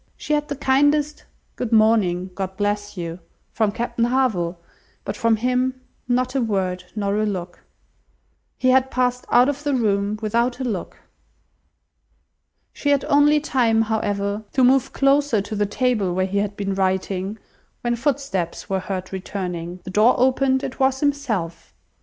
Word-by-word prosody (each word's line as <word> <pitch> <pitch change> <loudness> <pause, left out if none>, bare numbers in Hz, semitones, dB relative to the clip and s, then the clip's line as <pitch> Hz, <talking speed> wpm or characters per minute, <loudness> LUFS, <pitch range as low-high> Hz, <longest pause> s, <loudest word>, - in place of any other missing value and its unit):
She 300 - -3
had 295 0 0
the 285 - -3
kindest 290 +2 +1 0.3
"Good 245 -2 -4
morning, 210 -5 +3
God 190 0 -5
bless 205 0 -2
you!" 170 0 -5 0.3
from 220 -2 +1
Captain 235 +1 -1
Harville, 220 -9 0 0.5
but - - -3
from 230 -1 +2
him 255 +3 0 0.3
not 250 +1 0
a 270 - +1
word, 185 -5 -1
nor 200 -1 -1
a 215 - +1
look! 180 -3 -5 1.0
He 255 - +2
had 260 0 +4
passed 250 -1 0
out 245 +1 +5
of 285 0 -2
the 290 -2 +1
room 205 -3 0
without 235 +3 0
a - - -2
look! 220 -8 -4 1.8
She 290 - -2
had 285 -1 +2
only 295 0 +4
time, 235 -6 +2
however, 205 -1 -1
to 260 - +3
move 260 0 +4
closer 275 -4 +2
to 205 +2 -4
the 205 0 0
table 210 -5 0
where 185 0 +1
he 200 +1 -1
had 205 0 -2
been 195 -1 -2
writing, 190 +1 -1 0.4
when 240 0 0
footsteps 235 - -2
were 190 -1 0
heard 185 0 -5
returning; 180 -2 -5
the 185 - -7
door 215 +6 +4
opened, 265 +1 +2
it 260 - -5
was 265 0 +2
himself. 260 - -2
225 Hz, 160 wpm, -22 LUFS, 195-260 Hz, 1.8 s, out